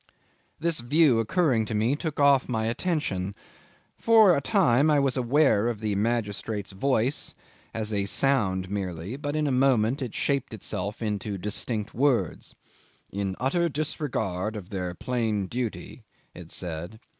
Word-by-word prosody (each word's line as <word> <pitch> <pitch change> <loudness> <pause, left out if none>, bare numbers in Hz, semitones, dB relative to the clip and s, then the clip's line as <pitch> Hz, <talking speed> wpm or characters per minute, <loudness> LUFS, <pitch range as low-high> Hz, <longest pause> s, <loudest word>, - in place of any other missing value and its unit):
This 165 -2 0
view 130 0 +4
occurring 120 -1 +2
to 110 - -4
me 115 +6 +2
took 155 -1 -4
off 140 -2 +4
my 110 -2 0
attention. 115 - -2 0.6
For 220 -6 +6
a 140 - 0
time 150 - +3
I 150 -1 +4
was 135 -2 +1
aware 125 -3 +3
of 120 -3 -2
the 105 -1 -1
magistrate's 105 -1 -2
voice 130 +5 0 0.4
as 110 -1 -3
a 100 -1 +1
sound 100 -6 +1
merely; 95 +1 -4
but 145 +1 -4
in 155 0 +1
a 145 - +1
moment 130 0 +2
it 125 -4 -4
shaped 140 -5 -1
itself 105 +1 -4
into 105 -1 -2
distinct 105 +2 -3
words... 125 - 0 0.6
"in 100 -1 -2
utter 170 +7 +1
disregard 125 - -2
of 100 -4 -8
their 90 -2 -3
plain 110 -3 -1
duty," 120 +3 -5 0.3
it 85 -2 -11
said. 85 +4 -5
115 Hz, 145 wpm, -26 LUFS, 100-140 Hz, 0.6 s, For